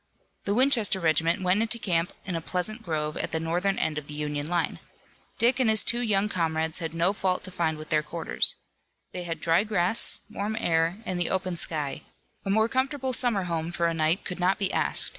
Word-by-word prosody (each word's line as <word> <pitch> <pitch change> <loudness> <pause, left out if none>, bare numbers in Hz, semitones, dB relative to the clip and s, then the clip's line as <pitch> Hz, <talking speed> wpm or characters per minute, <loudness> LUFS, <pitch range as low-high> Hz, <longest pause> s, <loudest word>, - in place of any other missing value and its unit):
The 200 - 0
Winchester 240 -6 +3
regiment 165 +2 +1
went 185 +3 +2
into 230 +1 +1
camp 175 -6 0
in 185 -3 -3
a 165 - -2
pleasant 185 +7 -2
grove 155 -5 -3
at - - -3
the 160 - 0
northern 175 +4 0
end 155 -1 -1
of 145 - -14
the 150 - -7
Union 150 -1 -3
line. 175 0 -1 0.6
Dick 245 +2 +2
and 250 -4 +3
his 220 -1 +5
two 240 - 0
young 210 -4 +1
comrades 160 -3 0
had 165 -1 -5
no 170 +4 +2
fault 185 -2 -1
to 185 - -7
find 165 -4 -1
with 155 0 -9
their 155 -1 +3
quarters. - - +1 0.6
They 180 -1 -5
had 165 -2 -4
dry 165 +4 +3
grass, 210 0 +3
warm 215 0 -4
air 165 -2 +1
and 180 -1 -2
the 175 - 0
open 185 -1 -1
sky. 150 -4 0 0.4
A 195 - -4
more 220 +3 +3
comfortable 260 +1 -1
summer 235 -6 +2
home 165 -1 -3
for 170 -1 -1
a 170 - +1
night 160 +3 0
could 180 -1 -5
not 185 +2 +2
be 195 -2 -1
asked. - - 0
180 Hz, 215 wpm, -27 LUFS, 165-210 Hz, 0.6 s, his